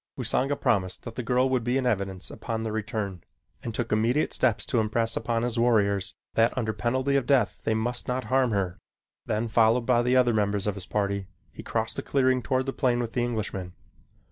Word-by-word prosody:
Usanga 140 +2 +1
promised 95 -8 0
that 115 - -7
the 125 - -4
girl 125 +2 +2
would 130 -3 +1
be 125 +3 +1
in 130 - -1
evidence 95 -5 -2
upon 110 -1 -4
their 110 -1 -3
return, 105 -4 -3 0.4
and 115 - -4
took - - -3
immediate 115 +7 +2
steps 120 -5 +1
to 120 - +1
impress 115 +1 0
upon 115 0 -1
his 120 -1 -1
warriors 100 -5 +2 0.2
that 115 +2 +2
under 110 -3 0
penalty 130 +5 0
of 135 -3 +1
death 130 -7 +2
they 110 - +2
must 120 +2 -2
not 125 +1 -1
harm 130 -1 +2
her. 95 -4 -1 0.5
Then, 110 +2 0
followed 115 +2 +3
by 120 -1 +3
the 125 +1 +2
other 125 -2 +4
members 105 -2 0
of 105 - 0
his 95 -2 -8
party, 100 -2 -1 0.2
he - - -9
crossed - - -2
the - - -1
clearing 130 -2 +2
toward 130 +1 0
the 135 - -3
plane 125 -3 +1
with 115 -2 -3
the 125 - 0
Englishman. 105 -6 -3
115 Hz, 210 wpm, -27 LUFS, 105-125 Hz, 0.5 s, other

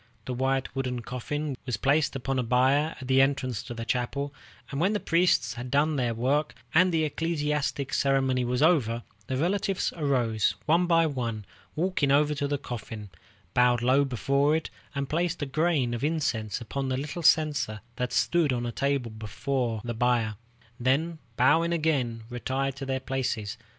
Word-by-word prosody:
The 130 - -3
white 135 +2 -1
wooden 125 -2 -2
coffin 140 +4 -3
was 120 -4 -1
placed 140 +5 +2
upon 135 0 -1
a - - +3
bier 130 +6 +2
at 130 - -8
the 135 0 +5
entrance 130 -4 0
to 120 -1 -8
the 115 0 -5
chapel, 140 +4 -2 0.4
and 140 +1 -2
when 190 +5 +3
the 210 - 0
priests 165 - +2
had 120 +2 -6
done 145 +3 +2
their 120 -4 0
work, 140 +6 0 0.2
and 180 +3 +5
the 160 -2 +2
ecclesiastical 150 -3 -1
ceremony 135 -2 +2
was 125 +3 0
over, 120 -9 +3 0.2
the 130 - -1
relatives 190 +4 0
arose, 125 -8 +1
one 170 +3 +3
by 165 -1 +4
one, 120 -8 -3 0.3
walked 180 0 -1
over 145 +2 +4
to 145 -1 -1
the 145 0 0
coffin, 110 -5 -7 0.4
bowed 125 -1 +3
low 130 +3 +4
before 140 +4 +1
it, 160 - -3 0.2
and 140 0 -2
placed 170 +4 -1
a - - 0
grain 145 -3 +1
of 120 - -4
incense 125 -10 -1
upon 135 +3 -3
the 130 - 0
little 150 +5 -4
censer 150 -9 +2 0.2
that 125 0 -2
stood 165 +2 +2
on 120 -1 -1
a 120 - -2
table 135 -2 -1
before 115 +2 -2
the 120 - -3
bier, 115 -2 +1 0.5
then, 155 +7 +1 0.2
bowing 165 +7 +4
again, 140 -9 0
retired 130 +2 -2
to 135 0 -6
their 130 0 -1
places. 125 -6 -2
135 Hz, 175 wpm, -27 LUFS, 120-150 Hz, 0.5 s, the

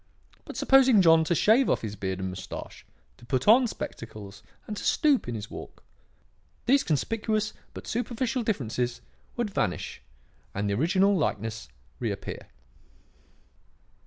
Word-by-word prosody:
But - - -8
supposing 265 -5 +6
John 165 -1 +6
to 170 - +1
shave 230 - +4
off - - +1
his 105 -1 -4
beard 95 -2 -3
and 95 0 -3
moustache, 95 +1 -8 0.3
to 120 - -16
put 130 0 -1
on 240 +4 +7
spectacles 105 - -8 0.2
and 210 - -5
to - - -6
stoop 295 - +2
in 120 - -3
his 105 -1 -7
walk, - - -10 0.8
these 270 +4 +4
conspicuous 215 - -1 0.2
but - - -8
superficial 245 +1 -2
differences 125 - -2 0.4
would 235 -4 -1
vanish 95 - -2 0.5
and 100 +1 -1
the 100 - 0
original 185 - +3
likeness 110 - -2 0.3
reappear. - - -4
165 Hz, 135 wpm, -27 LUFS, -, 0.8 s, on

